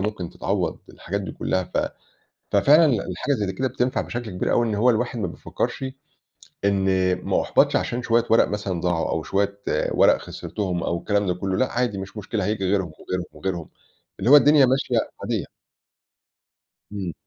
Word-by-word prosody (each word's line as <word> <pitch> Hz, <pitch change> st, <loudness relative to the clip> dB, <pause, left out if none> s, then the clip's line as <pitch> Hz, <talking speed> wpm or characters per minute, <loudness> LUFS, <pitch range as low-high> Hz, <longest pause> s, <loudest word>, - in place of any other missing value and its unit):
ممكن 95 Hz, -4 st, -3 dB
تتعوّض -, -, -2 dB
الحاجات 100 Hz, +4 st, -4 dB
دي 95 Hz, -, -6 dB
كلّها، 95 Hz, 0 st, -1 dB
ف -, -, -7 dB, 0.8 s
ففعلًا 150 Hz, +4 st, +6 dB
الحاجة 115 Hz, -, 0 dB
اللي 105 Hz, -5 st, -1 dB
زيّ 95 Hz, -, -2 dB
كده 130 Hz, +4 st, -1 dB
بتنفع 125 Hz, 0 st, 0 dB
بشكل 120 Hz, -2 st, -5 dB
كبير 90 Hz, -, -1 dB
أوي 120 Hz, -, +3 dB
إن 110 Hz, -, -1 dB
هو 120 Hz, +5 st, +4 dB
الواحد 120 Hz, +1 st, -1 dB
ما 100 Hz, -, -1 dB
بيفكّرش 90 Hz, +8 st, -4 dB, 0.8 s
إن 100 Hz, -1 st, +2 dB, 0.4 s
ما -, -, +2 dB
أحبطش -, -, +3 dB
عشان 120 Hz, -, -1 dB
شوية 115 Hz, 0 st, +2 dB
ورق 115 Hz, -, +5 dB
مثلًا 100 Hz, -4 st, -3 dB
ضاعوا، 85 Hz, -2 st, 0 dB
أو 80 Hz, -1 st, -1 dB
شوية 100 Hz, +1 st, -1 dB, 0.3 s
ورق -, -, +5 dB
خسرتهم 90 Hz, -5 st, -4 dB
أو 85 Hz, -, -1 dB
الكلام 100 Hz, +3 st, 0 dB
ده 90 Hz, -, +2 dB
كلّه، 95 Hz, +1 st, -2 dB
لأ 130 Hz, -, +1 dB
عادي 120 Hz, -4 st, 0 dB
مش 95 Hz, +3 st, -7 dB
مشكلة 105 Hz, -1 st, -2 dB
هييجي 105 Hz, -2 st, -1 dB
غيرهم، 95 Hz, -3 st, 0 dB
وغيرهم، 90 Hz, -1 st, -3 dB
وغيرهم، 90 Hz, -4 st, -4 dB, 0.5 s
اللي 110 Hz, +6 st, +1 dB
هو 145 Hz, -, +10 dB
الدنيا 145 Hz, -1 st, +7 dB
ماشية 130 Hz, +2 st, +1 dB, 0.3 s
عادية. -, -, -1 dB, 1.5 s
إمم. 95 Hz, -4 st, -4 dB
100 Hz, 175 wpm, -23 LUFS, 95-120 Hz, 1.5 s, هو